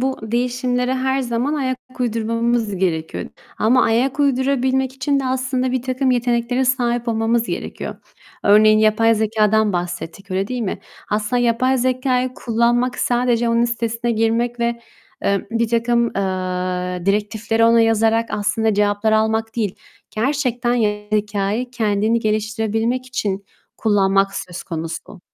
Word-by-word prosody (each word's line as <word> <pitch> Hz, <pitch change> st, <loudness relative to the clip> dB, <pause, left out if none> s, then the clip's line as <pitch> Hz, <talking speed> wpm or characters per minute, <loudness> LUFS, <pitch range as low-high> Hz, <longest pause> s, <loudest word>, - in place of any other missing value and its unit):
bu 265 Hz, +1 st, -1 dB
değişimlere 250 Hz, +2 st, -1 dB
her 265 Hz, +1 st, 0 dB
zaman 245 Hz, +4 st, -1 dB
ayak 260 Hz, -3 st, -1 dB, 0.2 s
uydurmamız 230 Hz, -2 st, 0 dB
gerekiyor. 165 Hz, -4 st, -2 dB, 0.3 s
Ama 250 Hz, +4 st, +4 dB
ayak 250 Hz, +5 st, +1 dB
uydurabilmek 265 Hz, -1 st, +1 dB
için 275 Hz, +1 st, 0 dB
de, -, -, -4 dB
aslında, 255 Hz, 0 st, -1 dB
birtakım 260 Hz, +1 st, 0 dB
yeteneklere 245 Hz, +1 st, +1 dB
sahip 240 Hz, -2 st, 0 dB
olmamız 225 Hz, +1 st, +1 dB
gerekiyor. -, -, -5 dB, 0.5 s
Örneğin; 215 Hz, +1 st, +6 dB
yapay 220 Hz, +1 st, +4 dB
zekâdan 220 Hz, -1 st, +2 dB
bahsettik, 175 Hz, +2 st, -5 dB
öyle 190 Hz, +1 st, 0 dB
değil 250 Hz, -1 st, -3 dB
mi? 190 Hz, -, -3 dB, 0.3 s
Aslında 215 Hz, +4 st, 0 dB
yapay 255 Hz, +3 st, +2 dB
zekâyı 255 Hz, 0 st, 0 dB
kullanmak, 240 Hz, +1 st, +1 dB
sadece 240 Hz, -1 st, +1 dB
onun 230 Hz, 0 st, +3 dB
sitesine 235 Hz, 0 st, -1 dB
girmek 230 Hz, +2 st, 0 dB
ve, 235 Hz, 0 st, -1 dB, 0.4 s
eee, 200 Hz, -1 st, +1 dB
birtakım, 235 Hz, +1 st, +1 dB
eee, 185 Hz, -2 st, -2 dB
direktifleri 220 Hz, +3 st, +1 dB
ona 230 Hz, 0 st, +5 dB
yazarak 225 Hz, 0 st, +2 dB
aslında 220 Hz, +1 st, 0 dB
cevaplar 205 Hz, +1 st, +1 dB
almak 220 Hz, +1 st, +1 dB
değil, 210 Hz, -5 st, -1 dB, 0.4 s
gerçekten, 245 Hz, -1 st, 0 dB
yapay 210 Hz, -3 st, -1 dB
zekâyı 210 Hz, +4 st, -2 dB
kendini 220 Hz, -1 st, +1 dB
geliştirebilmek 220 Hz, +3 st, -1 dB
için 200 Hz, -6 st, -3 dB, 0.3 s
kullanmak 195 Hz, -2 st, +2 dB
söz 180 Hz, -1 st, -6 dB
konusu. 165 Hz, +2 st, -6 dB
230 Hz, 125 wpm, -20 LUFS, 210-250 Hz, 0.5 s, Örneğin